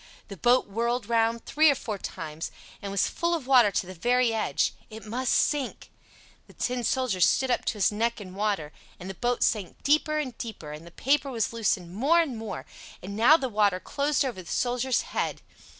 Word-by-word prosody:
The 200 Hz, -, -7 dB
boat 245 Hz, +6 st, +3 dB
whirled 235 Hz, +2 st, -2 dB
round 230 Hz, 0 st, +1 dB
three 310 Hz, +1 st, +4 dB
or 285 Hz, -, +3 dB
four 215 Hz, -6 st, -5 dB
times, 155 Hz, -2 st, -6 dB, 0.3 s
and 200 Hz, -, -5 dB
was 195 Hz, -, +2 dB
full 340 Hz, 0 st, 0 dB
of 310 Hz, -6 st, -5 dB
water 250 Hz, -5 st, +6 dB
to 195 Hz, -, -1 dB
the 185 Hz, -, -8 dB
very 245 Hz, +6 st, +2 dB
edge—it 220 Hz, 0 st, -2 dB
must 245 Hz, +3 st, -2 dB
sink. 285 Hz, -4 st, 0 dB, 0.6 s
The -, -, -17 dB
Tin 250 Hz, -1 st, -2 dB
Soldier 235 Hz, -6 st, 0 dB
stood 260 Hz, +8 st, +3 dB
up -, -, 0 dB
to -, -, 0 dB
his 210 Hz, -3 st, +2 dB
neck 230 Hz, +3 st, -1 dB
in 185 Hz, -3 st, -9 dB
water, 195 Hz, -7 st, -2 dB, 0.3 s
and 180 Hz, -, -8 dB
the 195 Hz, -, -5 dB
boat 245 Hz, +4 st, 0 dB
sank 205 Hz, -5 st, -1 dB
deeper 305 Hz, +1 st, +2 dB
and 270 Hz, -5 st, -3 dB
deeper, 215 Hz, -10 st, -7 dB
and 155 Hz, +3 st, -9 dB
the -, -, -12 dB
paper 280 Hz, +7 st, +1 dB
was 230 Hz, -3 st, -1 dB
loosened 195 Hz, -6 st, -1 dB
more 280 Hz, -, +3 dB
and 305 Hz, -7 st, 0 dB
more, 220 Hz, -3 st, -6 dB, 0.4 s
and 200 Hz, +2 st, -6 dB
now 240 Hz, +9 st, +6 dB
the 270 Hz, -, -2 dB
water 205 Hz, -5 st, +2 dB
closed 285 Hz, +6 st, 0 dB
over 235 Hz, -8 st, -4 dB
the 175 Hz, -, -13 dB
Soldier's 250 Hz, +1 st, +1 dB
head. -, -, -3 dB
230 Hz, 200 wpm, -27 LUFS, 200-260 Hz, 0.6 s, water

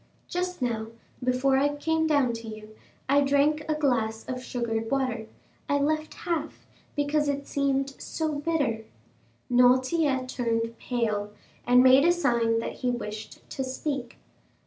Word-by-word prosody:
Just 360 Hz, -4 st, -2 dB
now, 225 Hz, -2 st, -1 dB, 0.4 s
before 255 Hz, +2 st, +2 dB
I 290 Hz, +2 st, +2 dB
came 320 Hz, +2 st, +1 dB
down 285 Hz, -6 st, +3 dB
to 230 Hz, 0 st, -7 dB
you, 215 Hz, 0 st, -9 dB, 0.3 s
I 280 Hz, +2 st, +4 dB
drank 285 Hz, +2 st, +2 dB
a 310 Hz, -, +2 dB
glass 230 Hz, -7 st, 0 dB
of 255 Hz, -1 st, -4 dB
sugared 225 Hz, -3 st, -2 dB
water; 255 Hz, -5 st, -1 dB, 0.4 s
I 285 Hz, -, +3 dB
left 310 Hz, +2 st, 0 dB
half, 340 Hz, -2 st, -4 dB, 0.3 s
because 290 Hz, 0 st, +1 dB
it 280 Hz, 0 st, -2 dB
seemed 275 Hz, -1 st, 0 dB
so 315 Hz, -1 st, -2 dB
bitter." 285 Hz, -8 st, 0 dB, 0.6 s
Noirtier 255 Hz, +3 st, +3 dB
turned 230 Hz, -2 st, -1 dB
pale, 215 Hz, -4 st, -1 dB, 0.4 s
and 250 Hz, +1 st, +7 dB
made 260 Hz, +1 st, +7 dB
a 340 Hz, -, +5 dB
sign 235 Hz, -9 st, +2 dB
that 230 Hz, -, -3 dB
he 250 Hz, -, -1 dB
wished 215 Hz, -3 st, -6 dB
to 265 Hz, -, -2 dB
speak. 260 Hz, -1 st, -4 dB
260 Hz, 145 wpm, -27 LUFS, 235-290 Hz, 0.6 s, and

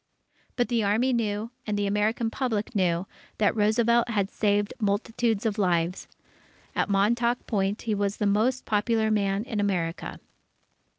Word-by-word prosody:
But 245 Hz, -1 st, 0 dB
the 235 Hz, -3 st, +1 dB
Army 225 Hz, +6 st, +2 dB
knew, 220 Hz, -1 st, -1 dB, 0.2 s
and 210 Hz, -1 st, -1 dB
the 205 Hz, -, 0 dB
American 215 Hz, +3 st, 0 dB
Public 230 Hz, -4 st, -2 dB
knew, 180 Hz, -3 st, +1 dB, 0.3 s
that 210 Hz, 0 st, +2 dB
Roosevelt 235 Hz, +2 st, +3 dB
had 200 Hz, -3 st, 0 dB
saved 205 Hz, -1 st, +1 dB
multitudes 220 Hz, +1 st, 0 dB
of 215 Hz, -1 st, 0 dB
lives. 175 Hz, -2 st, 0 dB, 0.7 s
At -, -, 0 dB
Montauk 235 Hz, +5 st, +1 dB
Point, 200 Hz, -1 st, -1 dB
he 225 Hz, -, -1 dB
was 200 Hz, 0 st, -1 dB
the 210 Hz, -, -1 dB
most 220 Hz, +6 st, +1 dB
popular 220 Hz, +1 st, +1 dB
man 200 Hz, -1 st, +1 dB
in 225 Hz, -4 st, -4 dB
America. 180 Hz, -5 st, -2 dB
210 Hz, 150 wpm, -26 LUFS, 200-230 Hz, 0.7 s, Roosevelt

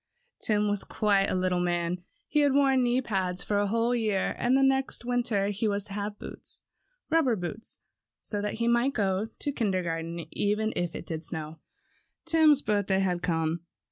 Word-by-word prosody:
Tim 210 Hz, -1 st, +2 dB
was 205 Hz, -1 st, 0 dB
quite 200 Hz, -2 st, +2 dB
a -, -, 0 dB
little 185 Hz, -1 st, +1 dB
man. 175 Hz, 0 st, 0 dB, 0.3 s
He 300 Hz, -, +1 dB
had 285 Hz, -2 st, +4 dB
worn 270 Hz, -2 st, +4 dB
knee 245 Hz, +1 st, +2 dB
pants 190 Hz, -6 st, -2 dB
for 205 Hz, 0 st, 0 dB
a 205 Hz, -, +1 dB
whole 230 Hz, +3 st, +1 dB
year, 215 Hz, -5 st, 0 dB
and 245 Hz, +2 st, +3 dB
next 270 Hz, -2 st, +2 dB
winter 235 Hz, -5 st, +1 dB
he 210 Hz, +2 st, -1 dB
was 200 Hz, -1 st, 0 dB
to 200 Hz, -, -7 dB
have 205 Hz, +1 st, -3 dB
boots, -, -, -5 dB, 0.5 s
rubber 310 Hz, -8 st, +4 dB
boots, 200 Hz, +4 st, -5 dB, 0.4 s
so 205 Hz, -2 st, -2 dB
that 210 Hz, -, -2 dB
he 230 Hz, +1 st, -1 dB
might 240 Hz, +3 st, +3 dB
go 195 Hz, 0 st, 0 dB
to 285 Hz, +5 st, -4 dB
kindergarten 170 Hz, -, -2 dB
even 215 Hz, +2 st, +1 dB
if 175 Hz, -1 st, -2 dB
it -, -, -6 dB
did 160 Hz, -1 st, -4 dB
snow. 160 Hz, -2 st, -6 dB, 0.7 s
Tim's 315 Hz, -3 st, +5 dB
birthday 205 Hz, -2 st, +1 dB
had 180 Hz, -2 st, 0 dB
come. 165 Hz, -1 st, 0 dB
205 Hz, 175 wpm, -28 LUFS, 185-240 Hz, 0.7 s, Tim's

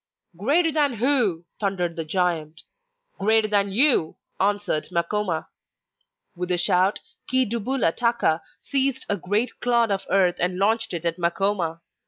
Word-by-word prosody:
'Greater 300 Hz, -, +2 dB
than 290 Hz, -4 st, +1 dB
who?' 225 Hz, -, +1 dB
thundered 180 Hz, -4 st, -2 dB
the 165 Hz, -, -3 dB
giant. 160 Hz, -2 st, -2 dB, 0.6 s
'Greater 220 Hz, +2 st, +3 dB
than 200 Hz, -1 st, +1 dB
you!' 235 Hz, -, +2 dB, 0.2 s
answered 200 Hz, -5 st, 0 dB
Makoma. 170 Hz, 0 st, -2 dB, 0.9 s
With 180 Hz, +1 st, -4 dB
a 180 Hz, -, +2 dB
shout, 185 Hz, +3 st, +2 dB, 0.3 s
Chi 260 Hz, 0 st, +3 dB
dubula 235 Hz, -3 st, -1 dB
taka 235 Hz, -9 st, +1 dB, 0.2 s
seized 270 Hz, -1 st, +2 dB
a 205 Hz, -, 0 dB
great 205 Hz, +7 st, -1 dB
clod 235 Hz, -3 st, +2 dB
of 195 Hz, -1 st, -2 dB
earth 185 Hz, -3 st, +2 dB
and 180 Hz, +1 st, -1 dB
launched 220 Hz, +1 st, +1 dB
it 170 Hz, 0 st, -5 dB
at 170 Hz, +1 st, -1 dB
Makoma. 170 Hz, -1 st, -1 dB
200 Hz, 140 wpm, -24 LUFS, 175-235 Hz, 0.9 s, Greater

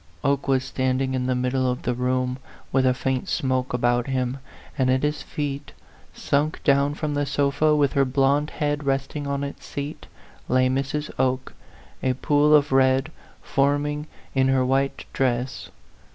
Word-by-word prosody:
Oke 140 Hz, 0 st, +1 dB
was 130 Hz, -1 st, +2 dB
standing 130 Hz, 0 st, 0 dB
in 130 Hz, -1 st, -1 dB
the 130 Hz, -, +1 dB
middle 125 Hz, +1 st, 0 dB
of 125 Hz, -, -3 dB
the 125 Hz, -, 0 dB
room, 125 Hz, +1 st, -1 dB, 0.3 s
with 130 Hz, -1 st, +3 dB
a 130 Hz, -, +4 dB
faint 130 Hz, 0 st, -2 dB
smoke 130 Hz, -1 st, 0 dB
about 120 Hz, 0 st, +1 dB
him; 130 Hz, 0 st, -1 dB, 0.4 s
and 130 Hz, -3 st, +1 dB
at 130 Hz, +1 st, +2 dB
his 150 Hz, 0 st, 0 dB
feet, 145 Hz, -1 st, -5 dB, 0.4 s
sunk 145 Hz, +2 st, 0 dB
down 140 Hz, 0 st, +3 dB
from 150 Hz, -1 st, -2 dB
the 145 Hz, 0 st, -1 dB
sofa, 145 Hz, +2 st, +2 dB
with 145 Hz, -2 st, +2 dB
her 140 Hz, -, +4 dB
blond 135 Hz, +3 st, +2 dB
head 145 Hz, 0 st, -2 dB
resting 135 Hz, +1 st, -2 dB
on 140 Hz, 0 st, -1 dB
its 140 Hz, -, -6 dB
seat, 145 Hz, +2 st, -6 dB, 0.4 s
lay 130 Hz, 0 st, +3 dB
Mrs. 135 Hz, +3 st, -2 dB
Oke, 130 Hz, 0 st, 0 dB, 0.5 s
a 130 Hz, -, +1 dB
pool 145 Hz, +3 st, +3 dB
of 145 Hz, -1 st, +3 dB
red 135 Hz, +2 st, +3 dB, 0.3 s
forming 145 Hz, +2 st, 0 dB, 0.3 s
in 135 Hz, -1 st, +3 dB
her 135 Hz, -1 st, +3 dB
white 135 Hz, +1 st, 0 dB
dress. 125 Hz, -1 st, -1 dB
135 Hz, 165 wpm, -24 LUFS, 130-145 Hz, 0.5 s, a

